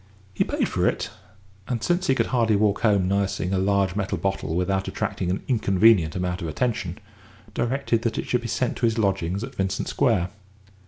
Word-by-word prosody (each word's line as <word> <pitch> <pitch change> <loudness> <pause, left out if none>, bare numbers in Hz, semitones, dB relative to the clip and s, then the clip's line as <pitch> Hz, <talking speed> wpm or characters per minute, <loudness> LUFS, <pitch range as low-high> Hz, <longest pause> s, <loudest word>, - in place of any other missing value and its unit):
He - - +2
paid - - -1
for - - +1
it, - - -1 0.6
and, 120 -3 -2
since 175 +2 +1
he 135 - +3
could - - +2
hardly 115 -3 +3
walk 100 0 +2
home 100 -5 +3
nursing 100 -1 0
a 95 - +2
large 100 -1 +1
metal 105 -2 -1
bottle 95 -4 -2
without 95 +2 0
attracting 90 - -2
an 95 - -2
inconvenient 100 - +4
amount 90 -1 -2
of 85 - -3
attention, 90 0 -2 0.6
directed 120 0 0
that 115 -1 -1
it - - -2
should 125 - 0
be 120 - -5
sent 125 +2 -1
to 120 - +2
his 115 0 -1
lodgings 95 -2 0
at 130 +2 -7
Vincent 95 0 -2
Square. 110 -10 +1
100 Hz, 195 wpm, -24 LUFS, 95-115 Hz, 0.6 s, inconvenient